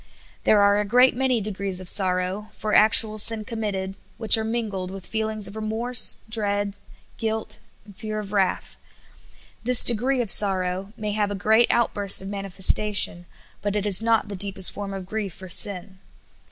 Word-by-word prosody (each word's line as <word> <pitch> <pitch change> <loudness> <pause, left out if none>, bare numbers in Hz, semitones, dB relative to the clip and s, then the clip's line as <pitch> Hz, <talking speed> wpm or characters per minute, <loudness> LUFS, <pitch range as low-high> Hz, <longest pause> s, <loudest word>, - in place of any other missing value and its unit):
There 210 -1 +2
are 200 0 +1
a - - -2
great 250 +5 +1
man}' 255 -4 -2
degrees 195 -2 -6
of 185 - -10
sorrow 185 +2 -1
for 215 -1 -7
act 215 +1 +4
ual 215 -1 -7
sin 220 0 +8
committed 205 -4 -6 0.2
which 220 -2 +5
are 220 - -2
mingled 220 -5 -6
with 190 -1 -12
feelings 220 -2 -4
of 200 - -12
remorse, 225 +3 0
dread, 205 -2 -2 0.5
guilt, 220 -1 -5 0.3
fear 215 +2 -8
of 210 -1 -9
wrath. 195 -2 -3 0.9
This 250 +1 +7
degree 250 +3 0
of 235 -4 -4
6o - - +11
SOUL - - +11
FOOD. - - +10
sorrow 190 0 -3
may 210 -1 -6
have 205 -1 -3
a 205 - -6
great 220 +4 0
outburst 205 -4 +1
of 195 - -9
manifestation, 195 -2 +1 0.3
but 205 0 -5
it 205 -1 -4
is 205 0 0
not 225 -1 -1
the 205 - -9
deepest 195 -1 +2
form 200 -1 -9
of 195 -1 -9
grief 200 -2 -7
for 190 - -13
sin. 190 +1 +2
205 Hz, 180 wpm, -21 LUFS, 195-220 Hz, 0.9 s, 6o